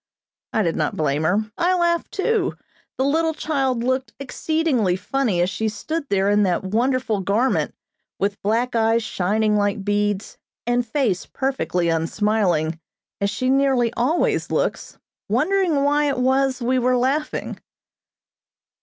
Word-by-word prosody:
I 220 - +1
did 165 -3 0
not 150 - -1
blame 150 -1 0
her; 210 +5 0
I 360 +1 +2
laughed 340 -1 0
too. 405 -1 0 0.4
The 265 - +1
little 320 +2 +1
child 270 -7 -1
looked 260 +1 -1
exceedingly 275 - 0
funny 215 -2 0
as 175 - +2
she 220 +2 -1
stood 285 +8 -4
there 195 -1 +2
in 205 0 +3
that 185 -3 +1
wonderful 230 +2 0
garment, 220 +7 0 0.4
with 200 +1 -2
black 235 +4 0
eyes 225 0 +2
shining 210 +2 0
like 205 -1 0
beads, 205 0 -1 0.3
and 245 +1 +1
face 225 -7 0
perfectly 180 - -1
unsmiling, 165 -1 0 0.4
as 200 - +1
she 205 +6 -2
nearly 265 -3 +2
always 265 +9 +1
looks, - - -2 0.3
wondering 370 -7 +2
why 290 +1 +2
it 280 -2 0
was 260 0 +1
we 255 +2 +2
were 250 +1 +2
laughing. 275 +5 -1
240 Hz, 140 wpm, -22 LUFS, 200-275 Hz, 0.4 s, in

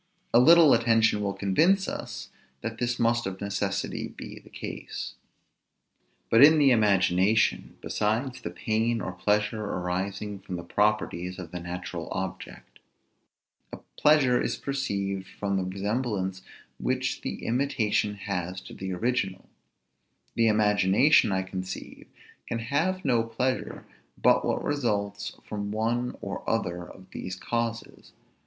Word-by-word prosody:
A 120 - +7
little 160 +3 +8
attention 115 -2 +3
will 100 -1 -2
convince 170 - +3
us - - -6 0.3
that 115 0 -5
this 120 0 0
must 120 -1 +1
of 95 0 -5
necessity 100 -1 -2
be - - -10
the - - -18
case. - - -6 1.2
But 115 +4 +7
in 155 +2 +8
the 140 -3 +5
imagination, 100 -1 +2
besides 125 +5 -1
the - - -4
pain 110 +6 0
or 95 - -4
pleasure 105 +4 0
arising 95 +2 -3
from 95 -1 -6
the 85 - -5
properties 95 -2 0
of 85 -3 -8
the 90 - -5
natural 85 -1 -6
object, 95 -1 -6 0.9
a - - -6 0.2
pleasure 145 -5 +4
is - - -1
perceived 100 -9 -3
from 100 +1 -3
the 95 - 0
resemblance 100 0 -2 0.4
which - - -1
the - - -5
imitation 115 -5 0
has 95 -2 -4
to - - -11
the 95 0 -5
original: 95 -2 -1 0.9
the 115 -1 +3
imagination, 105 +4 +4
I 95 0 0
conceive, 95 0 -7 0.4
can 115 - -2
have 155 +11 -1
no 120 -4 +3
pleasure 125 +3 -2 0.3
but - - +4
what - - -1
results 105 -8 -1
from 100 -1 -4
one 120 +3 -1
or 100 0 -5
other 90 -6 -2
of 95 -1 -15
these 95 - -5
causes. 115 +3 -4
105 Hz, 135 wpm, -27 LUFS, 95-120 Hz, 1.2 s, little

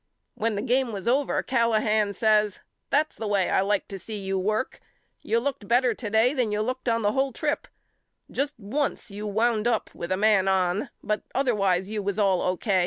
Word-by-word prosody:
When 225 0 -1
the 205 - -2
game 255 0 +1
was 200 0 -6
over 270 +4 +2
Callahan 220 -4 +2
says 210 -1 +2 0.3
That's 305 +2 +1
the 220 - -4
way 200 -3 +1
I - - +3
like 200 0 0
to 195 - -6
see 215 +4 -6
you 195 -1 -3
work. 215 +6 -1 0.4
You 230 - +1
looked 250 -5 -3
bet 245 +3 +4
ter 250 - +2
to 215 - -6
day 220 +5 +3
than 250 -6 0
you 210 0 0
looked 255 +2 -2
on 230 -1 +1
the 205 - +3
whole 270 +3 +1
trip. 295 +5 -2 0.6
Just 285 +2 -1
once 235 +2 -3
you 210 +1 -5
wound 220 +1 +1
up 230 -3 0
with 170 - -6
a 185 - +2
man 205 -2 +3
on 190 0 +1
but 215 0 -1
other 260 -2 +2
wise 190 -3 +1
you 210 0 -3
was 200 0 -2
all 195 -4 +3
O. 185 0 0
215 Hz, 210 wpm, -26 LUFS, 200-245 Hz, 0.6 s, bet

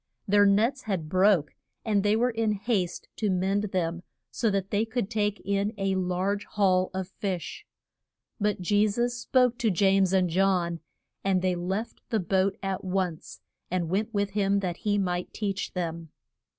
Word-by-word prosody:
Their 205 0 +5
nets 230 +7 +2
had 185 -7 -2
broke, 185 -4 +3 0.3
and 210 -3 +2
they 205 +1 +2
were 245 +3 +2
in 225 -2 0
haste 200 -4 -2
to 215 - 0
mend 190 +2 +1
them 175 -3 -2 0.3
so 230 - 0
that 195 -1 -1
they 205 +1 +2
could 225 -2 -3
take 210 -2 0
in 200 +2 0
a 195 -1 0
large 190 +2 -1
haul 185 -3 +2
of 190 -1 -4
fish. 190 -3 -5 0.7
But 210 -2 0
Je 205 +4 +3
sus 240 +4 0
spoke 250 0 +2
to 230 - +2
James 195 0 +3
and 190 -1 +3
John, 175 -1 +1 0.4
and 190 -2 +1
they 185 -1 +2
left 190 +6 -3
the 220 - +1
boat 190 +2 +1
at 195 -1 -2
once, 185 -3 -3 0.3
and 175 -2 -1
went 210 +4 0
with 200 -2 -1
him 200 -1 +1
that 180 -3 -2
he 205 -2 0
might 180 -2 -2
teach 200 -3 -3
them. 165 -2 -4
195 Hz, 170 wpm, -27 LUFS, 185-210 Hz, 0.7 s, Their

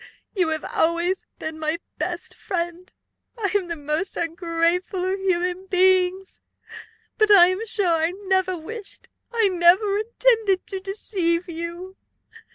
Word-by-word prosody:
You 365 -4 +2
have 315 -1 -2
always 340 +3 0
been 315 0 -6
my 310 +1 -1 0.2
best - - -3
friend! 345 -1 -4 0.5
I 410 -4 -1
am 385 -3 +1
the 340 - -3
most 305 +5 -3
ungrateful 340 +2 -1
of 380 +1 -1
human 365 0 -1
beings! 375 0 +2 0.8
But 430 -1 +4
I 365 -4 +8
am 370 +4 -2
sure 380 -7 +1
I 325 - +3
never 375 -1 0
wished, 410 +6 -8 0.2
I 455 -3 +3
never 375 +3 +4
intended, 445 -3 +1
to 385 - -5
deceive 375 -3 -2
you. 340 +3 -7
370 Hz, 135 wpm, -23 LUFS, 340-390 Hz, 0.8 s, I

